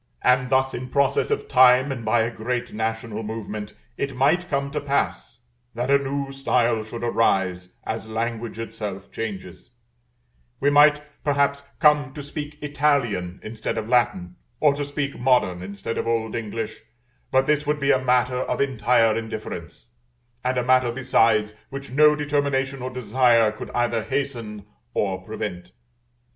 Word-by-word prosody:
And 125 Hz, 0 st, +3 dB
thus 130 Hz, 0 st, +2 dB
in 125 Hz, +1 st, -5 dB
process 140 Hz, 0 st, +2 dB
of -, -, -1 dB
time 130 Hz, +2 st, +5 dB
and 125 Hz, -4 st, -5 dB
by 110 Hz, +1 st, +2 dB
a 115 Hz, +1 st, 0 dB
great 120 Hz, +2 st, -3 dB
national 110 Hz, 0 st, -3 dB
movement, 105 Hz, -1 st, -6 dB, 0.2 s
it 140 Hz, -, -2 dB
might 160 Hz, +8 st, +2 dB
come 140 Hz, -1 st, -1 dB
to 150 Hz, 0 st, -2 dB
pass, 140 Hz, -4 st, -2 dB, 0.4 s
that 125 Hz, +3 st, -1 dB
a 140 Hz, -, +6 dB
new 140 Hz, 0 st, -3 dB
style 125 Hz, -4 st, +1 dB
should 115 Hz, +2 st, -7 dB
arise, 95 Hz, -6 st, +1 dB
as 110 Hz, 0 st, -4 dB
language 115 Hz, +1 st, -3 dB
itself 105 Hz, -4 st, -6 dB
changes; 95 Hz, -5 st, -6 dB, 0.9 s
we 145 Hz, +1 st, +3 dB
might 150 Hz, +1 st, +6 dB, 0.2 s
perhaps 140 Hz, -1 st, +1 dB, 0.2 s
come 150 Hz, -4 st, +3 dB
to 145 Hz, -, -6 dB
speak 150 Hz, +1 st, -7 dB
Italian 135 Hz, -11 st, 0 dB
instead 110 Hz, +1 st, -4 dB
of 110 Hz, -1 st, -3 dB
Latin, 115 Hz, -8 st, +1 dB, 0.2 s
or 150 Hz, -2 st, +4 dB
to 145 Hz, +1 st, -3 dB
speak 145 Hz, 0 st, -3 dB
modern 120 Hz, -8 st, +2 dB
instead 100 Hz, +4 st, -5 dB
of -, -, -3 dB
old 115 Hz, -1 st, -1 dB
English; 110 Hz, -1 st, -4 dB, 0.5 s
but 130 Hz, 0 st, +3 dB
this 150 Hz, 0 st, +1 dB
would 150 Hz, 0 st, +1 dB
be 140 Hz, 0 st, +3 dB
a 130 Hz, -1 st, +2 dB
matter 125 Hz, 0 st, +2 dB
of -, -, -2 dB
entire 120 Hz, -4 st, +3 dB
indifference, 110 Hz, -1 st, -6 dB, 0.5 s
and 125 Hz, 0 st, 0 dB
a 125 Hz, -, +1 dB
matter, 130 Hz, -1 st, +3 dB
besides, 115 Hz, -4 st, +2 dB, 0.2 s
which 135 Hz, -1 st, -7 dB
no 150 Hz, +2 st, +5 dB
determination 140 Hz, -2 st, -1 dB
or 130 Hz, -, -3 dB
desire 120 Hz, -2 st, +3 dB
could 110 Hz, -, -8 dB
either 120 Hz, -1 st, +1 dB
hasten 115 Hz, -6 st, -4 dB, 0.3 s
or 95 Hz, -2 st, 0 dB
prevent. 95 Hz, -3 st, -6 dB
125 Hz, 155 wpm, -24 LUFS, 110-140 Hz, 0.9 s, a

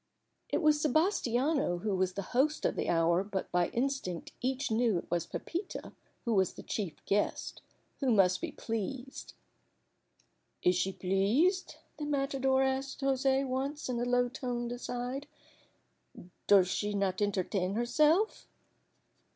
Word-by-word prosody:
It -, -, 0 dB
was 300 Hz, -1 st, +4 dB
Sebastiano 290 Hz, -, +2 dB
who 200 Hz, +2 st, -1 dB
was 185 Hz, 0 st, 0 dB
the 200 Hz, -, -4 dB
host 295 Hz, +5 st, +2 dB
of -, -, +1 dB
the -, -, -2 dB
hour, 170 Hz, +2 st, +3 dB
but 195 Hz, -2 st, -4 dB
by 175 Hz, -1 st, +2 dB
instinct 240 Hz, -9 st, -2 dB
each 265 Hz, +1 st, -1 dB
knew 225 Hz, -3 st, +2 dB
it 170 Hz, -, -7 dB
was 170 Hz, -1 st, 0 dB
Pepita 360 Hz, +3 st, -5 dB, 0.3 s
who 235 Hz, -, +1 dB
was 190 Hz, -3 st, +2 dB
the -, -, -10 dB
chief 195 Hz, -8 st, -4 dB
guest 205 Hz, +1 st, -1 dB, 0.4 s
who 270 Hz, -, +1 dB
must 190 Hz, -5 st, +4 dB
be 340 Hz, -2 st, -3 dB
pleased. 245 Hz, +3 st, -5 dB, 1.3 s
"Is 180 Hz, -, +5 dB
she 185 Hz, +2 st, +1 dB
pleased?" 210 Hz, -, +1 dB, 0.2 s
the 300 Hz, -, -4 dB
matador 275 Hz, -2 st, +1 dB
asked 265 Hz, +2 st, -2 dB
José 270 Hz, 0 st, +2 dB
once 270 Hz, +3 st, -3 dB
in 240 Hz, -2 st, -1 dB
a -, -, 0 dB
low 245 Hz, 0 st, +2 dB
toned 245 Hz, -1 st, -3 dB
aside. 245 Hz, +3 st, -4 dB, 1.2 s
"Does 195 Hz, -3 st, +6 dB
she 205 Hz, +2 st, -1 dB
not 195 Hz, -1 st, 0 dB
entertain 195 Hz, -1 st, 0 dB
herself?" 305 Hz, -, +2 dB
245 Hz, 140 wpm, -31 LUFS, 195-275 Hz, 1.3 s, Does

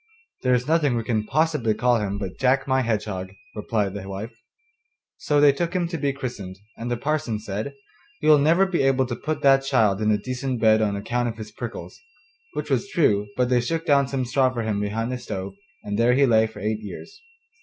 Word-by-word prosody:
'There 125 Hz, -1 st, +3 dB
is 125 Hz, +2 st, -2 dB
nothing 150 Hz, -5 st, +2 dB
we 115 Hz, -, -2 dB
can 110 Hz, -2 st, 0 dB
possibly 150 Hz, -6 st, +1 dB
call 120 Hz, 0 st, +2 dB
him 100 Hz, -1 st, -2 dB
but 95 Hz, -3 st, -6 dB
Jack 135 Hz, +1 st, +2 dB
my 130 Hz, -1 st, +2 dB
Hedgehog,' 105 Hz, -5 st, -3 dB, 0.2 s
replied 105 Hz, -2 st, -1 dB
the 100 Hz, -1 st, -7 dB
wife. 100 Hz, +4 st, -6 dB, 0.8 s
So 145 Hz, -1 st, +1 dB
they 145 Hz, -1 st, +7 dB
took 170 Hz, +5 st, -3 dB
him 175 Hz, -2 st, +1 dB
to 170 Hz, -, -3 dB
be 140 Hz, -1 st, +1 dB
christened, 120 Hz, -9 st, -6 dB, 0.2 s
and 115 Hz, +1 st, -5 dB
the 120 Hz, -, -1 dB
parson 140 Hz, -4 st, -1 dB
said: 105 Hz, +6 st, -5 dB, 0.4 s
'You'll 155 Hz, -1 st, +5 dB
never 165 Hz, +6 st, +4 dB
be 185 Hz, -3 st, 0 dB
able 135 Hz, -1 st, +3 dB
to 120 Hz, -1 st, -4 dB
put 155 Hz, +2 st, -4 dB
that 135 Hz, -1 st, +5 dB
child 105 Hz, -6 st, +2 dB
in 110 Hz, -, +2 dB
a 105 Hz, -, +3 dB
decent 130 Hz, +1 st, -3 dB
bed 110 Hz, -1 st, +4 dB
on 105 Hz, -2 st, +1 dB
account 120 Hz, +4 st, -1 dB
of 115 Hz, -, -7 dB
his 110 Hz, -1 st, -8 dB
prickles.' 115 Hz, +2 st, -7 dB, 0.5 s
Which 150 Hz, 0 st, -4 dB
was 130 Hz, -3 st, 0 dB
true, 105 Hz, -11 st, +2 dB
but 125 Hz, -1 st, +2 dB
they 125 Hz, -1 st, +3 dB
shook 165 Hz, +7 st, -2 dB
down 140 Hz, -4 st, +3 dB
some 130 Hz, -1 st, -2 dB
straw 130 Hz, +1 st, +2 dB
for 120 Hz, -2 st, -3 dB
him 110 Hz, -2 st, -1 dB
behind 110 Hz, +4 st, -2 dB
the 125 Hz, -, -3 dB
stove, 95 Hz, -5 st, -5 dB, 0.3 s
and 105 Hz, +1 st, -3 dB
there 120 Hz, +1 st, +4 dB
he 140 Hz, +1 st, +5 dB
lay 110 Hz, -3 st, +4 dB
for 110 Hz, -, -11 dB
eight 110 Hz, 0 st, -1 dB
years. 395 Hz, -, -10 dB
120 Hz, 220 wpm, -24 LUFS, 105-140 Hz, 0.8 s, they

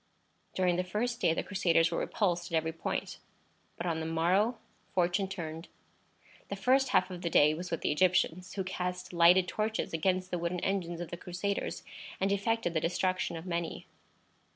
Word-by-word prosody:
During 180 Hz, -2 st, +2 dB
the 180 Hz, -, +1 dB
first 230 Hz, +6 st, -2 dB
day -, -, +4 dB
the -, -, -1 dB
Crusaders 170 Hz, -4 st, +2 dB
were 170 Hz, -, 0 dB
repulsed 175 Hz, -4 st, -1 dB
at -, -, 0 dB
every 160 Hz, 0 st, +1 dB
point; 165 Hz, -, -4 dB, 0.6 s
but 170 Hz, -, -4 dB
on 165 Hz, -2 st, 0 dB
the 160 Hz, -, -3 dB
morrow 185 Hz, +9 st, +2 dB, 0.4 s
fortune 180 Hz, +2 st, +2 dB
turned. 165 Hz, -3 st, -6 dB, 0.8 s
The 200 Hz, -, -2 dB
first 260 Hz, +5 st, +3 dB
half 185 Hz, -6 st, +3 dB
of 180 Hz, -1 st, -6 dB
the 170 Hz, -, -1 dB
day 150 Hz, -1 st, +5 dB
was 175 Hz, +3 st, -5 dB
with 165 Hz, -, -2 dB
the -, -, +1 dB
Egyptians, 180 Hz, +2 st, +2 dB
who 195 Hz, -, -1 dB
cast 180 Hz, -1 st, -4 dB
lighted 175 Hz, +2 st, +6 dB
torches 215 Hz, 0 st, -2 dB
against 185 Hz, +2 st, 0 dB
the 180 Hz, -, -1 dB
wooden 170 Hz, +1 st, -2 dB
engines 175 Hz, -3 st, -1 dB
of 175 Hz, -, -6 dB
the 175 Hz, -, -4 dB
Crusaders, 185 Hz, +4 st, -3 dB, 0.4 s
and 195 Hz, +1 st, +1 dB
effected 200 Hz, -2 st, 0 dB
the 160 Hz, -, +1 dB
destruction 180 Hz, 0 st, 0 dB
of 165 Hz, -, -8 dB
many. 170 Hz, -2 st, -3 dB
180 Hz, 180 wpm, -31 LUFS, 170-190 Hz, 0.8 s, lighted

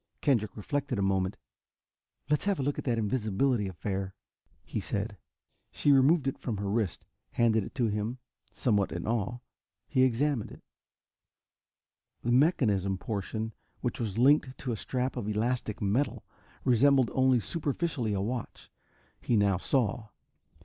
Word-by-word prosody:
Kendrick 115 Hz, -9 st, +1 dB
reflected 135 Hz, +3 st, -2 dB
a 100 Hz, -, +1 dB
moment. 95 Hz, 0 st, 0 dB, 0.9 s
"Let's 150 Hz, +3 st, +1 dB
have 200 Hz, -4 st, +1 dB
a -, -, 0 dB
look 145 Hz, +1 st, -1 dB
at -, -, -6 dB
that 120 Hz, -3 st, +1 dB
invisibility 110 Hz, 0 st, +1 dB
affair," 95 Hz, +1 st, -4 dB, 0.5 s
he -, -, -4 dB
said. -, -, -3 dB, 0.5 s
She 145 Hz, -, +2 dB
removed 140 Hz, +3 st, +5 dB
it 135 Hz, -, -2 dB
from 115 Hz, -5 st, -3 dB
her 100 Hz, 0 st, -3 dB
wrist, 105 Hz, -6 st, -1 dB, 0.3 s
handed 110 Hz, -2 st, +3 dB
it -, -, -9 dB
to 120 Hz, -, +1 dB
him. 105 Hz, +3 st, -1 dB, 0.3 s
Somewhat 105 Hz, -5 st, +1 dB
in 85 Hz, +1 st, -4 dB
awe, 115 Hz, +1 st, -1 dB, 0.5 s
he 130 Hz, -, +2 dB
examined 130 Hz, -1 st, +2 dB
it. -, -, -13 dB, 1.6 s
The 120 Hz, -, 0 dB
mechanism 110 Hz, -, +3 dB
portion, 110 Hz, +2 st, -3 dB, 0.3 s
which 120 Hz, -, -2 dB
was 110 Hz, -4 st, -3 dB
linked 135 Hz, +1 st, +3 dB
in 125 Hz, -, 0 dB
a -, -, -1 dB
strap 125 Hz, +4 st, -2 dB
of 100 Hz, -, -3 dB
elastic 110 Hz, 0 st, -1 dB
metal, 110 Hz, +9 st, 0 dB, 0.4 s
resembled 130 Hz, 0 st, +4 dB
only 130 Hz, -1 st, +4 dB
superficially 140 Hz, -, -2 dB
a 95 Hz, -, 0 dB
watch, 115 Hz, +3 st, -5 dB, 0.5 s
he 120 Hz, -, +2 dB
now 100 Hz, -2 st, +3 dB
saw. 115 Hz, +1 st, 0 dB
115 Hz, 145 wpm, -29 LUFS, 105-130 Hz, 1.6 s, removed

